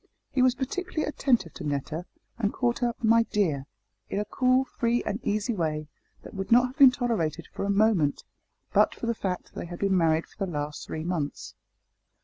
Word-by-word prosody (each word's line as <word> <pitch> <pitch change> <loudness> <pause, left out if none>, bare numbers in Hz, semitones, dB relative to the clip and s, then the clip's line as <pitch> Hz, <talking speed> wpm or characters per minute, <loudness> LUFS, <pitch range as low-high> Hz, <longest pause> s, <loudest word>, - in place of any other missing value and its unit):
He 265 - +1
was 255 0 +4
particularly 310 +5 -3
attentive 240 - +1
to - - -8
Netta, 150 +4 -3 0.3
and 205 -3 +1
called 240 -2 0
her 240 -1 0
"my 230 +1 +6
dear," 165 -12 0 0.4
in 200 - -1
a 210 - -1
cool 255 +4 +2
free 240 -1 0
and 210 +1 -2
easy 215 +2 0
way, 155 -5 -2 0.3
that - - -11
would 195 +1 -5
not 245 +2 +7
have 255 +3 -7
been 275 -2 +10
tolerated 220 - -1
for - - -3
a - - -2
moment, 200 -8 +2 0.5
but - - +4
for - - -5
the 235 - +1
fact 190 -5 -3
that - - -25
they - - -5
had 175 0 -7
been 195 0 +1
married 165 -2 +3
for 200 - -7
the 190 - -3
last 150 -1 -4
three 155 - -4
months. 165 -4 -3
205 Hz, 200 wpm, -27 LUFS, 165-240 Hz, 0.5 s, been